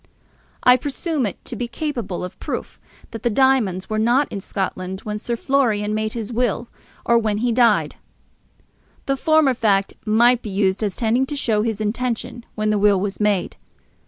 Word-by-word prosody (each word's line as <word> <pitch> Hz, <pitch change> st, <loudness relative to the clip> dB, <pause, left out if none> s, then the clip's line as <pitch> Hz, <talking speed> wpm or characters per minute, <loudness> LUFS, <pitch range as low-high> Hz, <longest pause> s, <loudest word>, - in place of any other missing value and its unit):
I 250 Hz, 0 st, +7 dB
presume 285 Hz, 0 st, -2 dB
it 195 Hz, -, -8 dB
to -, -, -6 dB
be 240 Hz, +2 st, -3 dB
capable 235 Hz, -, -4 dB
of 180 Hz, -, -8 dB
proof -, -, -5 dB, 0.3 s
that 225 Hz, -, -7 dB
the 240 Hz, -, +1 dB
diamonds 230 Hz, -7 st, +2 dB
were 215 Hz, 0 st, -1 dB
not 245 Hz, +6 st, +3 dB
in 200 Hz, -, -4 dB
Scotland 190 Hz, -1 st, -4 dB
when 210 Hz, 0 st, -4 dB
Sir 235 Hz, +2 st, -2 dB
Florian 225 Hz, -5 st, +1 dB
made 215 Hz, 0 st, -1 dB
his 230 Hz, 0 st, -5 dB
will 240 Hz, 0 st, -1 dB, 0.4 s
or 235 Hz, 0 st, +4 dB
when 215 Hz, -2 st, 0 dB
he 240 Hz, +3 st, 0 dB
died. 230 Hz, -2 st, +3 dB, 1.1 s
The 275 Hz, -, +1 dB
former 310 Hz, -1 st, +3 dB
fact 200 Hz, -4 st, +1 dB
might 235 Hz, +3 st, +4 dB
be 215 Hz, -, -6 dB
used 195 Hz, 0 st, 0 dB
as 205 Hz, -3 st, -1 dB
tending 240 Hz, +3 st, +1 dB
to 295 Hz, -, -4 dB
show 225 Hz, -6 st, +1 dB
his 220 Hz, -1 st, -2 dB
intention 240 Hz, +2 st, -3 dB
when 215 Hz, 0 st, 0 dB
the 210 Hz, -, +1 dB
will 205 Hz, -1 st, +4 dB
was 200 Hz, +1 st, -3 dB
made. 210 Hz, -3 st, 0 dB
225 Hz, 180 wpm, -21 LUFS, 210-250 Hz, 1.1 s, I